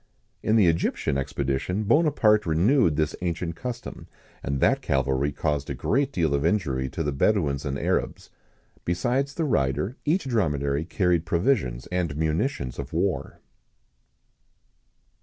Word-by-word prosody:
In 110 - +1
the 110 -4 +5
Egyptian 80 -4 +1
expedition 70 +8 -2
Bonaparte 110 - +3
renewed 85 - +3
this 75 0 0
ancient 85 -1 -2
custom, 120 +2 -7 0.3
and 70 0 -2
that - - +3
cavalry 65 +1 0
caused 75 0 -2
a - - -3
great 135 +3 0
deal 80 - 0
of 70 0 0
injury 75 -8 0
to 80 - -3
the 75 - -1
Bedouins 70 -2 +1
and 70 -1 -2
Arabs. - - -2 0.5
Besides 125 +11 -1
the 165 - 0
rider, 75 - 0
each 165 +6 +1
dromedary 75 - 0
carried 90 -3 +1
provisions 85 - 0
and 85 -5 -1
munitions 80 - -1
of - - -6
war. - - -2
85 Hz, 135 wpm, -25 LUFS, 70-110 Hz, 0.5 s, the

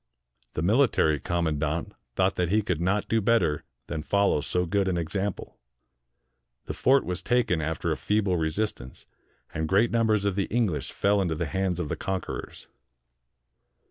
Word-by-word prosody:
The 75 - -1
military 100 - +3
com 85 +4 -1
mandant 80 +1 -1 0.2
thought 95 +1 +2
that 90 -2 -1
he 105 +3 +2
could 90 -5 -1
not 95 +4 0
do 115 0 +1
better 105 -9 +2 0.2
than 80 -2 -4
follow 100 -3 +2
so 90 +4 -1
good 95 +2 0
an 90 -2 0
example. 95 +4 -3 1.1
The - - -4
fort 135 +1 +3
was 90 -1 -3
taken 120 -9 +1
after 80 +1 -2
a - - -1
feeble 105 -3 +1
resistance; 80 - -3 0.5
and 80 0 -2
great 105 +5 +3
numbers 110 -3 +2
of 100 - +1
the 100 0 0
English 110 -9 -1
fell 100 0 +2
into 85 -4 -1
the 85 +2 -2
hands 95 +2 -1
of 85 - -2
the - - -2
conquerors. 95 -2 -5
95 Hz, 165 wpm, -27 LUFS, 80-105 Hz, 1.1 s, military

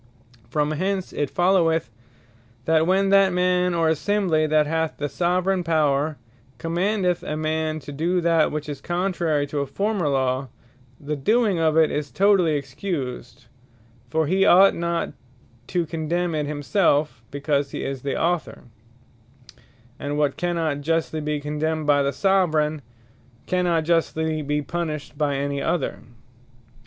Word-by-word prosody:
From 150 0 0
hence 190 +4 -2
it 145 -2 -1
followeth 170 -6 +2 0.7
that 160 0 +3
when 195 +1 +3
that 195 -1 +5
Man, 180 0 +1
or 165 -1 +2
Assembly, 160 -1 +1
that 155 0 +3
hath 160 +1 -1
the 145 - -2
Soveraign 180 +5 0
Power, 155 -2 +1 0.4
commandeth 180 - 0
a 150 - -4
man 155 0 -1
to 145 - -9
do 170 +6 0
that 165 -2 +2
which 150 0 -4
is 145 -2 -6
contrary 175 -4 0
to 145 +1 -4
a 140 - -2
former 195 +1 -1
Law, 130 -1 0 0.5
the 150 +1 -3
doing 210 - +2
of 160 -1 +2
it 160 -1 +4
is 145 -1 -3
totally 185 +1 +3
Excused: 135 - -5 0.6
For 160 +4 +1
he 190 +5 +2
ought 195 0 +6
not 170 0 -2 0.5
to 175 -2 0
condemn 165 +2 -2
it 150 -2 -1
himselfe, 145 - +1
because 140 0 -1
he - - -5
is 135 -2 -4
the 140 - -2
Author; 175 0 -1 1.4
and 145 +1 -3
what 145 -2 +1
cannot 165 -5 -1
justly 160 +1 -1
be 150 0 -2
condemned 150 +2 -2
by 145 -1 +4
the 140 0 +1
Soveraign, 155 -3 +1 0.6
cannot 175 -3 +1
justly 160 -1 0
be 150 0 -1
punished 155 -3 -4
by 145 -1 0
any 140 0 -2
other. 155 0 -1
160 Hz, 145 wpm, -23 LUFS, 145-175 Hz, 1.4 s, ought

